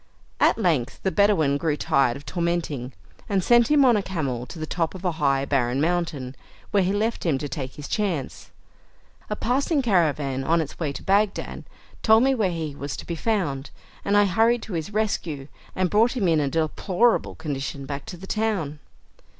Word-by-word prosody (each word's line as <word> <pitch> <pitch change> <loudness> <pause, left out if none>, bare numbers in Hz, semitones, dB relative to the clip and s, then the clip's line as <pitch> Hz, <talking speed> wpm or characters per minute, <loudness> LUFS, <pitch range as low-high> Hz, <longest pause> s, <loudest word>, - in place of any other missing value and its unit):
At - - +4
length 165 - 0
the 190 - +1
Bedouin 185 -9 +3
grew 150 0 -1
tired 135 -4 +2
of 145 - -13
tormenting, 170 -7 -2 0.4
and 195 -3 +1
sent 240 +2 +5
him 295 -2 +5
on 245 -3 +5
a 210 - +2
camel 140 -10 -3
to 165 - -9
the 155 - -4
top 165 +2 -2
of 185 0 -8
a 180 - +2
high 140 -4 +1
barren 130 -2 +1
mountain, 155 -5 -1 0.4
where 200 - +3
he 185 +1 +1
left 220 +3 -1
him 160 -6 +1
to 145 - -4
take 130 -1 -5
his 145 -1 -7
chance. 185 - -2 0.8
A 210 - -1
passing 275 +6 0
caravan, 150 - +1
on 165 +4 +2
its 155 -3 -4
way 155 -4 -1
to 140 - -8
Bagdad, 200 +1 0 0.4
told 220 +1 +5
me 270 0 +4
where 215 -7 +1
he 160 -4 -4
was 140 0 -5
to - - -8
be 170 - -4
found, 165 -8 -1 0.3
and 200 +1 +2
I 205 - +6
hurried 225 +5 +2
to 210 - -7
his 165 +3 -3
rescue, 175 -10 -2 0.3
and 185 0 +1
brought 230 +5 +3
him 200 -6 +1
in 160 -2 +3
a 145 -2 0
deplorable 180 +9 +1
condition 140 -2 -4
back 140 0 -6
to 180 - -7
the 190 - -10
town. 190 -9 -1
170 Hz, 195 wpm, -24 LUFS, 140-205 Hz, 0.8 s, I